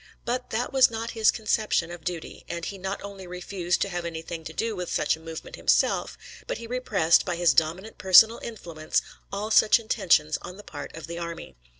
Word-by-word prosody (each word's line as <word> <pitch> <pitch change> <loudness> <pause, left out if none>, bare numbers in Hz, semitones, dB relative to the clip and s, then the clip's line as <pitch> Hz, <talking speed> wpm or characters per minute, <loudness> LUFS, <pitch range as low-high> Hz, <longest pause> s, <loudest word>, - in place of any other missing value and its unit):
But 250 +1 -2
that 240 +4 -2
was 260 -1 +6
not 230 0 -4
his 220 -1 +3
conception 215 -5 0
of 175 -2 -9
duty, 175 -3 -5
and 170 0 -4
he 195 - -6
not 190 +1 -3
only 195 -2 -8
refused 180 0 -2
to 200 - -4
have 175 -2 -3
anything 165 0 -6
to 160 - -6
do 225 +6 -2
with 180 -2 -5
such - - +1
a - - -16
movement 160 0 -8
himself, - - +1 0.3
but - - -2
he 230 - -8
repressed, 230 -9 +2
by 180 -3 -2
his 175 0 +3
dominant 175 +7 0
personal 220 +5 +7
influence, 170 -9 -3 0.3
all 210 +2 -3
such 215 0 +6
intentions 180 -9 +2
on 180 - -9
the 205 - -11
part 145 -6 -8
of 165 - -7
the 170 +1 -6
army. 170 - -7
180 Hz, 205 wpm, -26 LUFS, 170-220 Hz, 0.3 s, personal